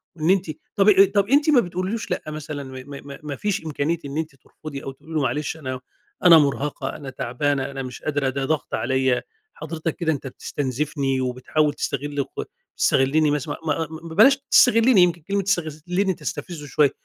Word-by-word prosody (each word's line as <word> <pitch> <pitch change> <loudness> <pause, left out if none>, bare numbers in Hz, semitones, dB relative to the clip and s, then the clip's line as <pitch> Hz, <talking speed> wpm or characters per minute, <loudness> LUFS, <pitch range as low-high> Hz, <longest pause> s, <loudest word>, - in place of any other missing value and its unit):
وإن 160 0 -1
أنتِ 185 -3 +2 0.2
طب 195 +1 +3 0.3
طب 200 -1 +3
أنتِ 290 +3 +4
ما 290 -5 +6
بتقوليش 185 +3 -3
لأ - - 0
مثلًا؟ 155 -1 -5
م 135 - -10
م 140 +2 -9
م - - -9
ما 145 -2 -4
فيش 200 +1 -2
إمكانية 155 +2 -1
إن 140 +1 -5
أنت 160 -3 -3
ترفضي 140 +2 -10
أو 135 - -5
تقولي 150 +4 -13
له 155 - +1
معلش، 145 +4 -1
أنا 130 -4 -5 0.4
أنا 170 -2 +9
مرهقة، 145 0 0
أنا 140 - -7
تعبانة، 130 +2 -1
أنا 135 -1 -5
مش 125 -1 -8
قادرة، 145 -3 0
ده 135 +1 -2
ضغط 155 0 -2
عليَّ، 130 +2 +1 0.3
حضرتك 160 0 -4
كده 165 -3 0
أنت 140 -3 -4
بتستنزفني 135 +1 -2
وبتحاول 130 +4 0
تستغل 145 +1 -2
ك - - -7 0.3
تستغلني 145 +3 +3
مث 150 -1 -1
ما 145 - -4 0.4
ما 165 -1 -9
بلاش 275 +7 +7
تستغلني 230 -3 +6
يمكن 175 -1 +3
كلمة 200 +5 -1
تستغلني 180 +1 -1
تستفزه 165 -3 -6
شوية، 145 -1 +3
150 Hz, 180 wpm, -23 LUFS, 135-170 Hz, 0.4 s, أنا